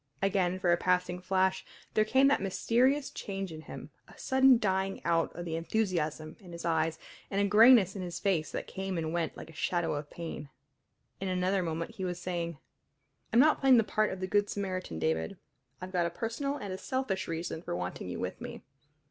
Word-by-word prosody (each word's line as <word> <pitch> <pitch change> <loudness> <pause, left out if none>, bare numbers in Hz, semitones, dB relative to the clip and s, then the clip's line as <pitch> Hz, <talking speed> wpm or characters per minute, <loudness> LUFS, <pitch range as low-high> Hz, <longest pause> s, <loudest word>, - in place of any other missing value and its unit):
Again 190 -2 +1
for 180 -2 +2
a - - +3
passing 180 0 +1
flash 190 0 +1 0.3
there 215 - +4
came 265 +5 +4
that 280 - +3
mysterious 250 +8 +2
change 195 -2 -5
in 155 -1 -8
him, - - -9 0.2
a - - -16
sudden 265 -1 +5
dying 195 -2 0
out 165 -1 +2
of 175 - -5
the 165 -1 -3
enthusiasm 165 -4 -1
in 180 -5 -12
his 170 - -7
eyes, 160 -1 +1 0.3
and 195 - -1
a 200 - +3
grayness 210 -2 +7
in 195 - -4
his 175 -1 -5
face 175 -7 0
that - - -4
came 190 -1 -4
and 160 0 -2
went 170 -1 -2
like 165 - -9
a - - -17
shadow 170 +2 0
of 145 0 -4
pain. 160 -4 -7 0.7
In 195 - -3
another 185 +1 +1
moment 165 -1 -4
he 190 - -4
was 180 -1 -3
saying: 170 -3 -3 0.7
"I'm 230 - +4
not 305 +4 +5
playing 265 -2 +6
the 225 - +5
part 215 +1 +1
of 190 - -6
the - - 0
good 205 +2 +1
Samaritan, 185 - -3
David. 80 0 -1 0.4
I've 185 +1 -7
got 175 -2 +2
a - - -2
personal 230 +10 -3
and 200 -6 -5
a 190 - -6
selfish 260 -7 -2
reason 165 0 -4
for 130 - -4
wanting 90 0 -4
you - - -5
with - - -4
me. - - -7
185 Hz, 205 wpm, -30 LUFS, 170-205 Hz, 0.7 s, grayness